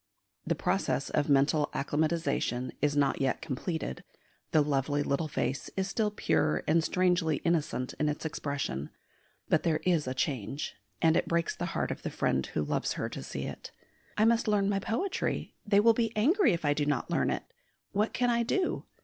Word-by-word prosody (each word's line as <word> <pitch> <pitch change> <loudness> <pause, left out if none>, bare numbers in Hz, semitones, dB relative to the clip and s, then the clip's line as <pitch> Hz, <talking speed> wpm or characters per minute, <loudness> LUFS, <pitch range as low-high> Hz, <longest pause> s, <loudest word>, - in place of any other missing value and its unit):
The - - +2
process - - 0
of 150 0 +1
mental 145 +2 +3
acclimatisation 145 -4 0
is 145 0 +1
not 140 -1 +2
yet 135 -1 +1
completed, 140 - -4 0.5
the 155 - +4
lovely 145 0 0
little 145 +3 0
face 140 -2 -2
is 190 0 0
still 210 +2 0
pure 155 -6 +1
and 165 +1 +4
strangely 180 -3 +2
innocent 155 -6 0
in 150 - +2
its 150 +2 -4
expression; 140 - -3 0.6
but 160 - +3
there 165 -2 +1
is 170 -6 +2
a 130 - -2
change, 135 0 -2 0.3
and 160 0 +5
it - - +1
breaks 170 -1 0
the - - -3
heart - - 0
of - - -5
the - - -3
friend 65 0 0
who 75 - -2
loves - - -1
her - - -3
to - - -6
see - - -5
it. - - -6 0.5
"I 215 - +4
must 230 0 +3
learn 205 -2 +3
my 200 -1 +1
poetry. 245 - -2
They 205 -1 +5
will 230 +2 +6
be 225 -1 -1
angry 295 - +4
if 170 -3 -2
I 145 - +4
do 145 0 -1
not 145 -2 -1
learn - - +2
it. - - -2 0.5
What 210 +2 +1
can 245 -1 +1
I 235 0 +2
do?" 360 +11 0
160 Hz, 190 wpm, -30 LUFS, 145-200 Hz, 0.6 s, will